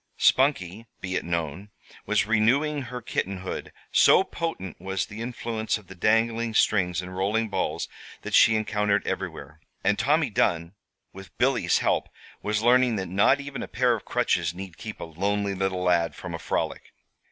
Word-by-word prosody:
Spunkie, 115 - +2
be 95 -1 -4
it - - -1
known, 85 +3 -3 0.4
was 105 -1 +2
renewing 130 +8 +2
her 125 0 -7
kittenhood, 95 -4 -3 0.2
so - - +6
potent 165 - -5
was 95 0 -2
the 105 +2 -9
influence 115 -2 -2
of 105 - -15
the 95 - -11
dangling 115 +3 +1
strings 90 -5 +2
and 90 +1 -8
rolling 105 +4 0
balls - - -2 0.4
that - - -6
she 110 - +6
encountered 105 -1 +1
everywhere; 75 +3 -5 0.2
and 105 - +2
Tommy 150 -1 +2
Dunn, 85 -7 +1 0.4
with 95 0 -12
Billy's - - +2
help, - - 0 0.3
was 105 +1 -1
learning 125 0 +4
that 95 -3 -3
not 100 +9 +4
even 140 -1 -6
a - - -5
pair 125 -1 +2
of 110 - -4
crutches 90 -9 0
need 95 -2 -8
keep 110 -1 -8
a - - -5
lonely 100 +5 -1
little 95 -1 -1
lad 85 -4 +2
from - - -7
a - - -4
frolic. - - -3
105 Hz, 165 wpm, -26 LUFS, 95-115 Hz, 0.4 s, so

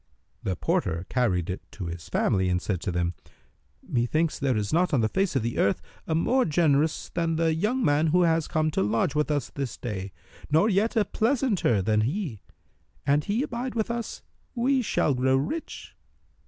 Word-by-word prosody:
The 95 - -2
porter 85 +1 -1
carried 95 -10 +1
it 95 -1 -4
to 100 - -6
his 85 -2 -7
family 95 -1 +1
and 90 0 +1
said 90 -2 -3
to 95 - -2
them, 85 0 -1 0.7
"Methinketh 150 +7 0
there 135 -4 +1
is 105 +3 -2
not 175 -1 +3
on 125 - +2
the 110 - +3
face 190 - 0
of 130 - +1
the 115 0 -2
earth 100 - +2 0.3
a 160 - 0
more 255 +11 +3
generous 155 - +1
than 165 -1 -1
the 165 0 +2
young 215 +10 0
man 145 +2 +3
who 180 +3 +4
has 165 -2 +2
come 155 -1 0
to - - 0
lodge 110 +6 +1
with 150 0 0
us 145 -4 -1
this 135 -5 -4
day, 100 -5 -5 0.4
nor 160 +9 +4
yet 215 +4 +1
a 215 -2 +3
pleasanter 220 - +1
than 105 +1 +2
he. 135 - -2 0.6
An 145 +1 +3
he 210 - -1
abide 245 -2 -4
with 225 0 0
us, 235 -1 -5 0.3
we 260 +2 +2
shall 170 - +1
grow 130 +1 +2
rich." 155 - -4
150 Hz, 190 wpm, -26 LUFS, -, 0.7 s, who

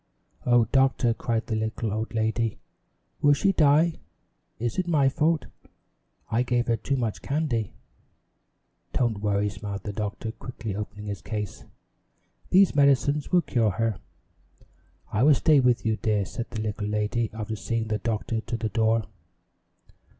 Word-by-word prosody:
"Oh, 120 -1 +5
Doctor," 130 -3 +3
cried 115 0 -2
the 110 - -2
little 110 0 -2
old 110 +1 -3
lady, 110 0 0 0.6
"will 145 0 +6
she 195 +7 +2
die? 160 0 +3 0.6
It 120 +4 -2
is 180 - -1
my 145 -5 +3
fault. 155 +3 +1 0.9
I 115 +2 +2
gave 120 -1 +1
her 115 - +2
too 135 +5 -2
much 115 -4 -2
candy." 135 -8 -1 1.2
"Don't 115 -5 0
worry," 105 0 +1
smiled 100 0 -6
the 105 - -4
doctor, 110 +1 -4
quickly 115 -3 -6
opening 105 0 -6
his 100 -1 -5
case. 105 -3 -5 0.8
"These 190 -3 +5
medicines 140 +1 +3
will 180 -2 +4
cure 115 -3 +1
her." 110 +1 -1 1.1
"I 105 - +1
will 145 +2 +6
stay 150 +2 +4
with 125 -3 +2
you, 110 -1 +1
dear," 105 -2 0
said 115 +5 -6
the 110 -2 -4
little 105 -1 -3
lady, 105 +2 0
after 110 0 -4
seeing 115 +1 -2
the 110 -1 0
doctor 110 +1 -2
to 115 - -4
the 110 - -2
door. 110 0 +2
115 Hz, 150 wpm, -26 LUFS, 105-135 Hz, 1.2 s, will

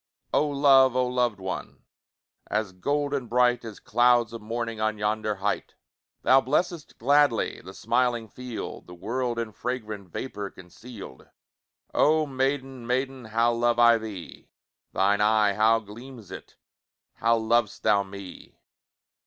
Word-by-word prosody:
Oh 150 - +3
love! 135 -3 +5
oh 130 0 +2
loved 125 -4 0
one! 95 -1 -6 0.7
As 105 -2 -1
golden 140 +6 -2
bright, 125 0 +2
As 110 -3 -9
clouds 120 0 +3
of 115 - -7
morning 115 0 -4
On 110 0 0
yonder 105 0 -1
height! 100 +2 -3 0.5
Thou 135 +1 +6
blessest 155 +4 -2
gladly 140 -1 +2
The - - -11
smiling 120 -3 0
field, 125 +1 -7
The 90 - -11
world 120 +5 -2
in 115 -2 -3
fragrant 110 -5 -5
Vapour 100 0 -5
conceal'd. 95 - -12 0.6
Oh 155 +1 +3
maiden, 135 -2 -2
maiden, 130 0 -2
How 115 +2 +2
love 120 0 +1
I 120 -1 +6
thee! 105 -6 -9 0.4
Thine 100 +2 +2
eye, 105 -1 +3
how 110 +2 +4
gleams 115 +1 -11
it! - - -10 0.6
How 115 +1 +3
lov'st 115 -1 0
thou 105 -2 +4
me! 100 -1 -10
115 Hz, 135 wpm, -26 LUFS, 105-130 Hz, 0.7 s, Thou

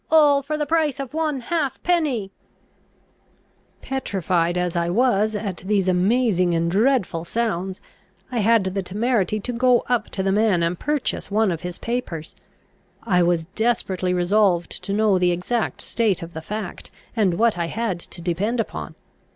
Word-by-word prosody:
All 295 -3 +5
for 305 +2 -3
the 300 - -1
price 310 -3 +1
of 275 -1 -5
one 305 -4 -1
halfpenny_." 290 - 0 1.5
Petrified 185 -9 -1
as 180 -1 -1
I 170 0 0
was 215 0 +2
at 200 -4 -3
these 195 +1 0
amazing 185 -1 +2
and 170 0 0
dreadful 205 -5 +1
sounds, 190 -2 -2 0.5
I 245 - -1
had 225 0 +4
the 190 +1 -2
temerity 215 +2 0
to 245 - -4
go 245 0 +3
up 245 -1 0
to 190 - -2
the 195 - +1
man 205 -4 +2
and 170 +1 -1
purchase 295 -2 -2
one 210 -1 +2
of 165 - -4
his 180 -1 -5
papers. 225 -10 -4 0.7
I 180 -6 +2
was 170 -2 +2
desperately 190 -2 -1
resolved 180 0 +2
to 200 - -3
know 205 -2 +3
the 180 -1 +3
exact 215 +7 -2
state 215 -7 0
of 170 +1 -9
the 160 - -6
fact, 210 +2 -6 0.3
and 200 -6 +2
what 230 +4 +3
I 170 -1 -2
had 210 -2 -2
to 170 0 -9
depend 200 +8 -1
upon. 225 - -4
205 Hz, 160 wpm, -22 LUFS, 180-240 Hz, 1.5 s, All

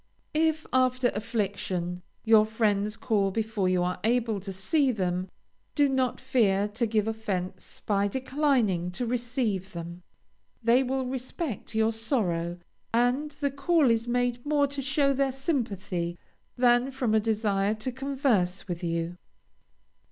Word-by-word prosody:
If, 315 0 +1
after 255 -1 +3
affliction, 195 -5 -2 0.2
your 220 -1 +7
friends 215 -1 0
call 205 -5 +1
before 215 -2 -1
you 180 -1 +2
are 180 0 -2
able 225 -2 +1
to 195 +1 -6
see 265 - +1
them, 185 -3 -2 0.5
do 290 -2 +4
not 260 -2 0
fear 210 -7 +2
to 225 +3 -1
give 215 -1 +1
offence 190 -5 -4
by 200 -1 +2
declining 255 - +1
to 245 - -2
receive 235 -5 -2
them. 170 +1 -7 0.6
They 235 +3 +5
will 265 0 -1
respect 255 - -4
your 220 0 +3
sorrow, 180 - -1 0.3
and 245 +6 +2
the 285 -1 -2
call 280 0 +3
is 230 +1 0
made 245 0 0
more 290 -1 +2
to 280 0 -4
show 275 +1 +2
their 275 0 +1
sympathy 205 - -2 0.4
than 245 +1 +4
from 255 -4 -1
a 220 - +5
desire 210 -2 +1
to 220 +4 -4
converse 255 -9 0
with 175 -1 -4
you. 170 +1 -2
225 Hz, 140 wpm, -28 LUFS, 195-260 Hz, 0.6 s, your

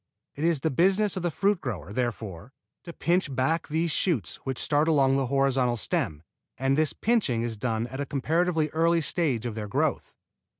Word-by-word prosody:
It 145 - -6
is 165 -4 +2
the 160 - 0
business 195 +7 +3
of 185 - -3
the 175 - 0
fruit 195 +4 +1
grower, 100 - -5
therefore, 110 -3 -4 0.3
to 170 - -7
pinch 170 -4 0
back 155 +6 0
these 160 +2 0
shoots 145 - 0
which 130 -2 -5
start 150 +1 +1
along 135 -4 +3
the 135 -1 0
horizontal 130 -2 +1
stem, 75 -7 -1 0.3
and 135 +1 +1
this 155 0 +2
pinching 200 - 0
is 115 -1 -3
done 110 +1 -2
at 130 +3 -7
a 145 - -3
comparatively 160 +3 0
early 165 +2 +2
stage 145 - 0
of 120 - -3
their 105 -1 -5
growth. 100 - -1
140 Hz, 185 wpm, -27 LUFS, 120-165 Hz, 0.3 s, business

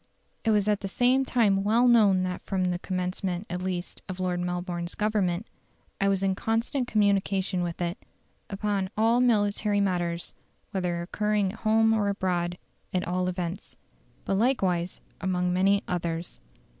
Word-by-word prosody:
It 225 - +1
was 210 -2 +3
at 210 -1 +2
the 195 - -4
same 250 +6 +2
time 205 -7 +2
well 230 +4 +4
known 205 -6 +5
that 185 0 -3
from 190 -2 -1
the 180 -1 0
commencement 180 0 -2
at 180 0 -3
least 180 -1 -4
of 185 0 -5
Lord 180 -1 -1
Melbourne's 175 0 -3
Government, 210 -3 0 0.5
I 195 - +2
was 195 -1 +1
in 195 -1 +2
constant 230 +6 -1
communication 195 -3 +1
with 170 -1 -3
it, 175 +2 -3 0.5
upon 200 -1 -1
all 230 +3 +4
military 205 -3 +2
matters, 175 -3 -1 0.4
whether 180 -3 -1
occurring 210 +1 0
at 220 - -12
home 225 0 +3
or 210 -2 +1
abroad, 180 -3 -1 0.3
at 185 - -1
all 180 +1 0
events. 180 -1 -4 0.5
But 195 - +1
likewise 185 -8 +1 0.2
upon 180 0 0
many 195 +2 +3
others." 170 -1 -3
190 Hz, 155 wpm, -27 LUFS, 180-210 Hz, 0.5 s, known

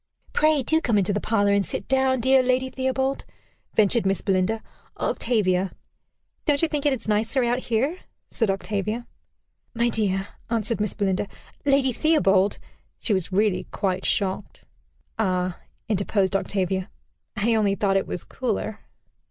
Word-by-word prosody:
"Pray 305 -3 +3
do 320 +6 +2
come 230 -9 +2
into 200 0 +2
the 205 - 0
parlor, 205 -2 +2
and 200 0 +3
sit - - -5
down, 265 -1 +2
dear 260 +2 +5
Lady 255 +1 +1
Theobald," 265 +1 -1 0.5
ventured 215 +2 +3
Miss 195 0 0
Belinda. 195 +3 0 0.4
"Octavia" 195 -5 +1 0.8
"Don't 295 0 +2
you - - +5
think 295 -2 -1
it 285 - +3
is 230 -4 -6
nicer 220 +5 +1
out 240 +1 +1
here?" 260 +9 -1 0.3
said 225 -4 0
Octavia. 210 +4 -2 0.7
"My 235 +1 +2
dear," 195 -4 0 0.2
answered 230 -1 -1
Miss 210 - -1
Belinda. 195 -1 0 0.4
"Lady 275 -2 +4
Theobald" 200 - +3 0.4
She 220 - 0
was 185 -1 -1
really 200 0 +1
quite 190 -1 -2
shocked. 195 0 -1 0.6
"Ah!" 185 -3 0 0.3
interposed 200 -1 +1
Octavia. 190 -1 -1 0.5
"I 220 +2 +2
only 205 -3 +2
thought 195 0 +1
it 195 - +1
was 180 - -4
cooler." 220 -3 -3
215 Hz, 145 wpm, -24 LUFS, 195-255 Hz, 0.8 s, dear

